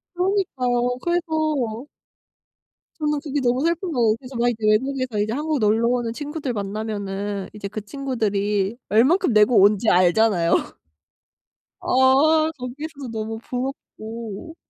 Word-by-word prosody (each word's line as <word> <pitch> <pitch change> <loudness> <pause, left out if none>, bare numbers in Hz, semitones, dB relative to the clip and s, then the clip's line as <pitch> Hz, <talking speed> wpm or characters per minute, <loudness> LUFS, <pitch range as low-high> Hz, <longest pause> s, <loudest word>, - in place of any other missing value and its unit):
그러니까요. 255 -11 0
그래서 310 -9 -1 1.1
저는 300 -1 0
그게 290 -1 -2
너무 250 +1 +1
슬픈 340 +2 -1
거예요. 230 -6 +2
그래서 255 0 -11
막 240 +1 +2
이제 220 -2 -3
외국에서 255 +1 +1
이제 210 +2 0
한국 300 +1 -1
놀러 220 +2 +2
오는 240 -2 0
친구들 290 -1 -4
만나면은 200 -1 -4
이제 205 -1 -6
그 215 +1 -6
친구들이 210 -4 -1
얼마큼 265 - +3
내고 215 +2 +5
온 205 +2 +5
지 220 - +1
알잖아요. 180 0 +3 1.3
아아 300 +5 +4
거기에서도 275 +3 -7
너무 220 0 -4
부럽고. 235 0 -6
245 Hz, 300 characters per minute, -22 LUFS, 215-285 Hz, 1.3 s, 내고